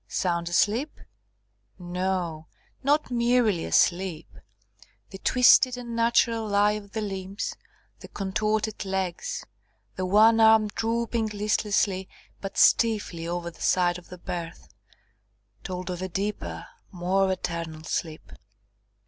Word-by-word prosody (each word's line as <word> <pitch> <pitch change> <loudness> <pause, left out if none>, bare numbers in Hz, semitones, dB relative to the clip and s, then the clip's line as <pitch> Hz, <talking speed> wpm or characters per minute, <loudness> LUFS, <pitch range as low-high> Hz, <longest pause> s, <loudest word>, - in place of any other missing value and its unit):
Sound 170 -2 -1
asleep? 220 - +1 0.8
No, 180 -3 -3 0.3
not 290 0 +1
merely 235 -6 +2
asleep 175 -3 +1 0.8
the 190 - -9
twisted 250 +1 +5
unnatural 230 -1 +1
lie 205 0 +3
of 210 -1 -7
the 220 - -2
limbs, 195 -1 -4 0.4
the - - -11
contorted 215 +2 -2
legs, 190 - -3 0.5
the 185 0 -2
one 220 +4 +5
arm 220 -1 +6
drooping 230 +1 -1
listlessly 205 -2 0 0.3
but 195 - -7
stiffly 205 -7 +3
over 170 0 -3
the - - -18
side 180 -1 +2
of 175 - -19
the 180 - -9
berth, 170 -1 -7 0.9
told 185 -1 -5
of 180 0 -5
a 185 - -3
deeper, 170 - -4 0.3
more 190 +2 +1
eternal 165 -3 -4
sleep. 160 0 -4
195 Hz, 115 wpm, -26 LUFS, 175-220 Hz, 0.9 s, arm